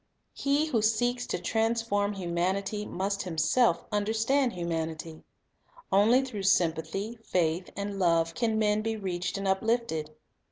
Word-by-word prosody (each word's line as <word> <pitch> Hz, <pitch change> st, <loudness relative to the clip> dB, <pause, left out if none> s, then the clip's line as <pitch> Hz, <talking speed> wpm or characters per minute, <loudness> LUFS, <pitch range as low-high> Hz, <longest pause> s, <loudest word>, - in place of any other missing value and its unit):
He 285 Hz, +2 st, +1 dB
who 245 Hz, -8 st, 0 dB
seeks 245 Hz, +3 st, +1 dB
to -, -, -1 dB
transform 225 Hz, -2 st, 0 dB
humanity 195 Hz, +3 st, -2 dB
must 200 Hz, +2 st, -2 dB
himself 185 Hz, +8 st, +2 dB
Sympathy 210 Hz, -, -6 dB
understand 225 Hz, +5 st, +1 dB
humanity. 165 Hz, -2 st, -4 dB, 0.7 s
Only 225 Hz, +7 st, +5 dB
through 215 Hz, -6 st, -5 dB
sympathy, 195 Hz, +3 st, 0 dB
faith, 175 Hz, -1 st, 0 dB
and 200 Hz, 0 st, -4 dB
love 165 Hz, -2 st, +2 dB
can 225 Hz, +2 st, 0 dB
men 210 Hz, -1 st, +2 dB
be 225 Hz, 0 st, -2 dB
reached 180 Hz, -2 st, -3 dB
and 195 Hz, 0 st, -3 dB
uplifted. 190 Hz, -5 st, 0 dB
200 Hz, 130 wpm, -28 LUFS, 175-225 Hz, 0.7 s, Only